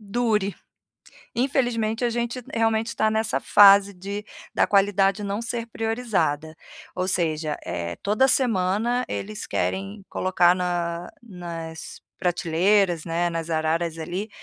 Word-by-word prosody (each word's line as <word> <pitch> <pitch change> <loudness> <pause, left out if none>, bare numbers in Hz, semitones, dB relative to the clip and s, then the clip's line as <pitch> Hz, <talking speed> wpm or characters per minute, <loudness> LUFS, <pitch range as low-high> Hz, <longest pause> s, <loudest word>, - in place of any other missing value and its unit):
dure, 210 -2 0 0.8
infelizmente 240 -3 0
a 240 - +2
gente 240 +2 -2
realmente 225 0 +1
tá 220 0 +2
nessa 220 0 0
fase 200 -1 +7
de 200 +3 -6 0.3
da - - +3
qualidade 200 0 +2
não 200 +2 -2
ser 235 0 -4
priorizada, 215 -10 -1 0.4
ou 185 0 -2
seja, 155 -4 0
eh, 85 0 -4
toda 215 +7 +3
semana 235 +1 +1
eles 210 +1 -5
querem 195 +1 -3
colocar 180 -1 +3
na 175 -1 -2
nas 170 -6 -8 0.2
prateleiras, 175 0 +2
né, 170 +1 0
nas 165 0 -4
araras 165 +1 0
ali, 175 +6 -4
195 Hz, 120 wpm, -24 LUFS, 175-220 Hz, 0.8 s, fase